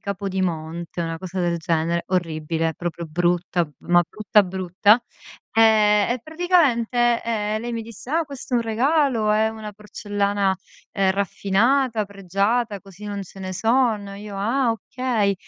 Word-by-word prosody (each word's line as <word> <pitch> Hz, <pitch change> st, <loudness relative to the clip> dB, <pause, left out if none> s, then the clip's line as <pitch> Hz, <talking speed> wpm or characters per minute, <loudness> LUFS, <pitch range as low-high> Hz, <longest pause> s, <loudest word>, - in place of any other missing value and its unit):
Capodimonte, 175 Hz, -4 st, -3 dB
una 165 Hz, -1 st, -3 dB
cosa 185 Hz, +1 st, -5 dB
del 170 Hz, -1 st, +1 dB
genere: 165 Hz, 0 st, 0 dB
orribile, 165 Hz, -2 st, -1 dB
proprio 175 Hz, -1 st, -4 dB
brutta, 175 Hz, +1 st, 0 dB
ma 175 Hz, 0 st, +4 dB
brutta 210 Hz, 0 st, +3 dB
brutta. 190 Hz, +5 st, +2 dB, 0.5 s
Ehm, 215 Hz, -1 st, +5 dB
e 245 Hz, -1 st, -1 dB
praticamente, 255 Hz, -8 st, +2 dB
ehm, 215 Hz, -1 st, -1 dB
lei 240 Hz, 0 st, -4 dB
mi 230 Hz, -, -3 dB
disse: 230 Hz, +3 st, -10 dB
"Ah, 330 Hz, +2 st, +2 dB
questo 275 Hz, -3 st, -6 dB
è -, -, +5 dB
un 235 Hz, -, +1 dB
regalo, 235 Hz, -1 st, +2 dB
è 215 Hz, +1 st, +3 dB
una 220 Hz, -1 st, -7 dB
porcellana, 205 Hz, -1 st, -1 dB, 0.4 s
ehm, 195 Hz, -1 st, +2 dB
raffinata, 215 Hz, +5 st, +1 dB
pregiata, 200 Hz, +3 st, -1 dB
così 195 Hz, +1 st, -13 dB
non 200 Hz, -1 st, -4 dB
ce 195 Hz, +1 st, -13 dB
ne 185 Hz, 0 st, -4 dB
sono." 220 Hz, -1 st, +1 dB
Io: 205 Hz, 0 st, -8 dB
"Ah, 235 Hz, +5 st, +1 dB
okay." 225 Hz, -2 st, -1 dB
205 Hz, 145 wpm, -23 LUFS, 185-230 Hz, 0.5 s, Ehm